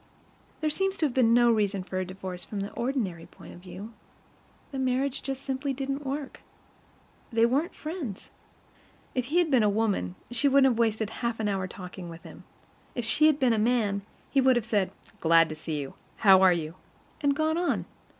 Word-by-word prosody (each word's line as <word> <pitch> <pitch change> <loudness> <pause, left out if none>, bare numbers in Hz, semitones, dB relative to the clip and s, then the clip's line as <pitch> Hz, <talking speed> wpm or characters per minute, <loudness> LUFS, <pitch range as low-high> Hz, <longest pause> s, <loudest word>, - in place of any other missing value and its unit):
There 310 - +1
seems 385 +4 0
to 315 - +1
have 275 - -1
been 240 -3 +4
no 240 0 +5
reason 200 -3 +1
for 185 0 -5
her 185 - 0
divorce 185 -1 -7
from 205 -2 -5
the 200 - -4
ordinary 230 -10 -2
point - - -13
of - - -12
view; 185 +5 -9 0.8
the 270 - -4
marriage 260 +1 0
just 270 0 -5
simply 270 +1 -2
didn't 275 +2 -3
work. 280 0 -4 0.9
They 230 0 +4
weren't 275 +8 0
friends. 305 - -6 0.8
If 255 -2 -1
he 300 +7 -1
had 345 -3 +3
been 255 -3 +5
a 210 - +4
woman, 200 - 0 0.2
she 245 +4 +1
wouldn't 270 -1 +5
have 235 - -2
wasted 220 -2 +1
half 235 -2 -1
an 215 - 0
hour 195 -2 -1
talking 180 -1 -9
with 165 0 -10
him. - - -12 0.5
If 240 - -2
she 305 +7 +4
had 305 -2 +3
been 255 -4 +3
a 220 - +1
man, 215 -3 +1 0.3
he 275 - +4
would 260 -1 +5
have 240 -3 0
said: 205 -5 +1 0.3
"Glad 165 0 +5
to 155 - -5
see 155 -1 -4
you. 140 -2 -6 0.2
How 190 -2 +7
are 190 -1 +7
you?" 165 -2 -2 0.5
and 285 -2 +2
gone 315 +2 +1
on. 350 - 0
230 Hz, 200 wpm, -28 LUFS, 190-270 Hz, 0.9 s, How